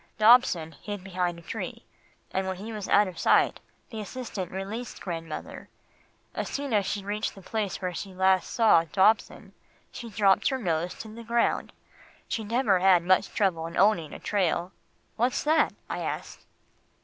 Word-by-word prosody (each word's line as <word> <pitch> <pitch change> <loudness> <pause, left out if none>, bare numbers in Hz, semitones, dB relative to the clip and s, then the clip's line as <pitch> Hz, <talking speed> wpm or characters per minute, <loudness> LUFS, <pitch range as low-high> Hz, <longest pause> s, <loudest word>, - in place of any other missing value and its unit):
Dobson 215 -8 +5
hid 205 -3 -6
behind 180 -2 -2
a 170 - -13
tree, - - -6 0.5
and 190 0 -1
when 190 - -2
he 215 +5 -7
was 210 -3 -6
out 205 0 +5
of 185 - -8
sight, - - +3 0.3
the 220 - -6
assistant 210 -5 -6
released 205 +6 -5
grandmother. 165 -3 -6 0.6
As - - -3
soon 280 -3 -3
as 200 -3 +2
she 205 - -2
reached 210 +2 -2
the 195 - -12
place 210 -1 -3
where 180 -1 -3
she 195 +3 -6
last 190 0 +2
saw 220 -8 +5
Dobson, 195 +6 +1 0.4
she 235 - -8
dropped 200 -3 +3
her 265 - -1
nose 175 -6 -1
to 225 - -9
the 230 +1 -9
ground. 235 +1 0 0.6
She 225 - -2
never 215 -3 +2
had 185 -2 +5
much 185 +1 +3
trouble 175 -6 0
in 170 - -7
owning 185 -5 +3
a - - -7
trail 180 -3 0 0.2
" - - -41
"What's 245 +3 +1
that?" 315 +2 +3 0.2
I - - -4
asked. - - -5
195 Hz, 175 wpm, -27 LUFS, 180-220 Hz, 0.6 s, Dobson